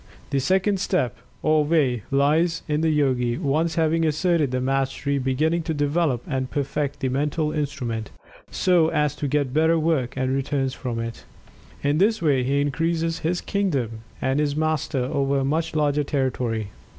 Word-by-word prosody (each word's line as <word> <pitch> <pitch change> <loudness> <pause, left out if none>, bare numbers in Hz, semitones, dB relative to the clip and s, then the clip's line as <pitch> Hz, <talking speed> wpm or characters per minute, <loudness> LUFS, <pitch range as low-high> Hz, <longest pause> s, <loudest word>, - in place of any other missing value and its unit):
The 140 - +2
second 190 +7 +1
step, 180 -10 0 0.3
or 155 -1 +3
way, 145 -7 +2
lies 155 +5 +2
in 150 0 0
the 160 - +2
Yogi, 130 -5 +1
once 160 +1 0
having 165 0 +2
asserted 160 -1 +2
the 130 0 -1
mastery, 135 +2 0
beginning 150 +6 +1
to 160 - 0
develop 145 -3 0
and 130 -2 -2
perfect 145 0 -2
the 130 - 0
Mental 150 +3 0
instrument, 130 -8 -3 0.4
so 175 -3 +3
as 150 -3 0
to 145 - -2
get 140 -2 0
better 160 +2 +3
work 155 -6 0
and 130 0 0
returns 135 -1 -1
from 125 -3 -4
it. 115 0 -5 0.6
In 145 +2 +2
this 215 +3 +3
way 145 -6 +2
he 140 +3 +1
increases 165 +3 0
his 175 +2 -1
kingdom 140 - -1 0.2
and 135 +2 +1
is 145 -1 0
Master 155 -3 0
over 140 +1 0
a 135 - 0
much 160 +3 -1
larger 150 -1 +2
territory. 125 -6 -1
145 Hz, 165 wpm, -24 LUFS, 130-160 Hz, 0.6 s, or